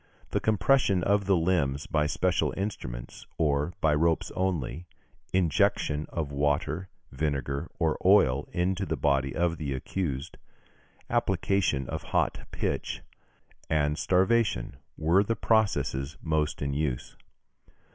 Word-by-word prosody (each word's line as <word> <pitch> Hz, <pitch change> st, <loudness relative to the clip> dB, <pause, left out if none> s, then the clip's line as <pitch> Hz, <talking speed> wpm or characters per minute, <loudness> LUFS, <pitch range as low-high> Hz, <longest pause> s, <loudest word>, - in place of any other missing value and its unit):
The -, -, +1 dB
compression 105 Hz, -2 st, +2 dB
of 100 Hz, +1 st, +2 dB
the 100 Hz, -, +5 dB
limbs 80 Hz, -5 st, +1 dB
by 75 Hz, -1 st, +1 dB
special 90 Hz, +3 st, 0 dB
instruments, -, -, -5 dB
or 75 Hz, +1 st, +1 dB
by 80 Hz, -1 st, +4 dB
ropes 80 Hz, +2 st, +1 dB
only; 90 Hz, -3 st, -2 dB, 0.4 s
injection 75 Hz, -3 st, +1 dB
of 75 Hz, -4 st, -3 dB
water, 75 Hz, +5 st, 0 dB, 0.2 s
vinegar, 70 Hz, +1 st, -2 dB
or -, -, +1 dB
oil, 65 Hz, +3 st, +4 dB
into 95 Hz, +2 st, 0 dB
the -, -, -1 dB
body 70 Hz, -2 st, +1 dB
of 85 Hz, -1 st, 0 dB
the 70 Hz, -3 st, -2 dB
accused; 70 Hz, +1 st, -4 dB, 0.7 s
application 80 Hz, -10 st, +1 dB
of -, -, -4 dB
hot -, -, -1 dB
pitch, -, -, -3 dB, 0.7 s
and 75 Hz, -1 st, +2 dB
starvation, 95 Hz, -, +1 dB, 0.2 s
were 85 Hz, +5 st, +3 dB
the 115 Hz, +3 st, -1 dB
processes 100 Hz, -, +1 dB
most 75 Hz, -2 st, 0 dB
in 70 Hz, 0 st, -1 dB
use. 70 Hz, -4 st, -2 dB
80 Hz, 120 wpm, -28 LUFS, 70-95 Hz, 0.7 s, the